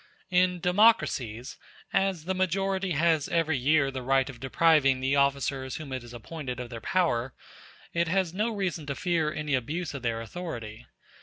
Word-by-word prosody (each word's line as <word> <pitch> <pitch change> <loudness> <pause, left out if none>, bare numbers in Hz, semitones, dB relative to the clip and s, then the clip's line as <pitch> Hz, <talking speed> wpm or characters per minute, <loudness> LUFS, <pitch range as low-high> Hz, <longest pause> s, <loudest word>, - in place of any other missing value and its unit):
In 180 0 +3
democracies, 180 - +2 0.3
as 190 -5 +1
the 190 - 0
majority 190 0 0
has 160 -1 +2
every 165 -2 +1
year 140 +1 +3
the 130 -1 -5
right 135 +1 +2
of 120 - -15
depriving 135 0 +3
the 135 +2 +1
officers 140 -1 0
whom 145 -4 -6
it 130 - -3
has 120 0 -12
appointed 125 +1 -6
of 125 -1 -6
their 115 -1 -7
power, 135 -9 0 0.6
it 170 0 +1
has 185 -1 0
no 215 +5 0
reason 185 -8 -3
to 140 - -2
fear 170 -3 0
any 150 -1 -3
abuse 150 +6 -2
of 140 - -6
their 115 -2 -1
authority. 115 -5 -7
150 Hz, 170 wpm, -28 LUFS, 130-180 Hz, 0.6 s, In